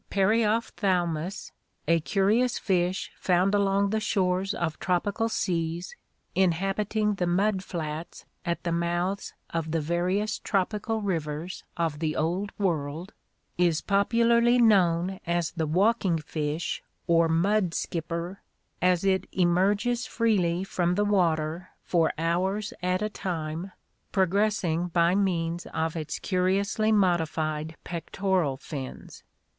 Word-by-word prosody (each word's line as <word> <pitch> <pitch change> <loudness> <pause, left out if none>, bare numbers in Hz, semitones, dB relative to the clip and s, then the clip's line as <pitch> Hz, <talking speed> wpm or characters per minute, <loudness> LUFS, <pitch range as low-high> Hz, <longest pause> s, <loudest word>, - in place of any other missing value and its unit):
Periopkthalrnus, 195 -5 0 0.4
a 165 0 +4
curious 210 +9 +2
fish 185 -1 0
found 185 +2 +2
along 200 0 +2
the 220 - +1
shores 195 -1 0
of 160 -2 -2
tropical 205 +5 0
seas, 170 - -2 0.4
inhabiting 195 +4 +1
the 180 -3 -1
mud 190 +2 +1
flats 160 -2 -5 0.2
at 170 0 -2
the 170 - -1
mouths 175 +3 -1 0.2
of 165 -1 -2
the 165 +1 0
various 180 +7 0
tropical 210 +2 -1
rivers 165 -2 -3
of 165 -3 -1
the 155 -1 -1
Old 180 +6 -1
World, 165 -1 -2 0.5
is 170 -3 +3
popularly 235 +4 +3
known 190 -5 +3
as 170 -1 0
the 160 -2 -2
walking 190 +1 +2
fish 155 +1 -3 0.2
or 165 -1 +3
mud 180 +2 +2
skipper, 170 +3 -3 0.4
as 180 -1 +3
it 190 -1 +1
emerges 200 +7 +2
freely 190 -7 +1
from 180 -2 0
the 205 +2 +2
water 170 -3 +1
for 165 -3 +2
hours 185 +6 0
at 180 +2 0
a 215 - 0
time, 170 -2 -4 0.4
progressing 190 -3 +1
by 170 0 +3
means 175 -3 0
of 160 0 -2
its 155 -2 -3
curiously 200 +3 +1
modified 160 -5 +1
pectoral 175 -3 -1
fins. 135 -2 -8
180 Hz, 120 wpm, -27 LUFS, 165-200 Hz, 0.5 s, a